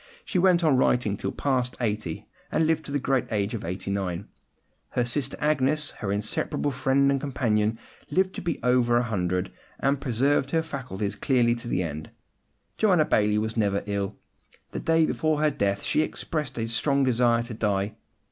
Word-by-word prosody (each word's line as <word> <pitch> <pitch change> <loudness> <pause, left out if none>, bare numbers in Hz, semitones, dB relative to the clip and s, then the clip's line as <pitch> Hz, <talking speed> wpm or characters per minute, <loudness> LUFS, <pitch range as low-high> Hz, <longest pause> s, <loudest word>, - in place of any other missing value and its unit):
She 185 - 0
went 180 -1 +4
on 150 -5 +4
writing 120 -5 +2
till - - -3
past 130 -3 -1
eighty, 105 -8 -2 0.3
and 160 - +2
lived 160 0 +1
to - - -7
the 145 - +1
great 135 -2 0
age 100 -1 0
of 115 - -4
eighty 90 +3 -4
nine. 95 -1 -2 0.6
Her 125 - 0
sister 135 +2 -1
Agnes, 150 0 +1
her 100 - -4
inseparable 110 +8 -1
friend 135 +1 +2
and 135 -1 0
companion, 115 -6 0 0.3
lived 190 0 +1
to - - -6
be 170 - -2
over 125 -1 +3
a 120 - +2
hundred, 90 -5 -1 0.3
and 140 0 +1
preserved 135 +2 +1
her 160 +2 +1
faculties 130 -10 -4
clearly 120 -4 +2
to 120 0 -6
the 90 -6 0
end. 75 -1 -5 0.7
Joanna 185 -8 +4
Baillie 105 -4 +2
was 110 +1 -1
never 100 -3 +1
ill. 100 0 -2 0.6
The - - -4
day 165 0 +3
before 155 -1 0
her 155 0 +3
death 100 -5 -1
she - - +2
expressed 150 -4 -3
a 115 -1 -1
strong 140 +4 +1
desire 120 -2 +3
to 120 0 -7
die. 105 -1 -1
125 Hz, 180 wpm, -26 LUFS, 105-145 Hz, 0.7 s, went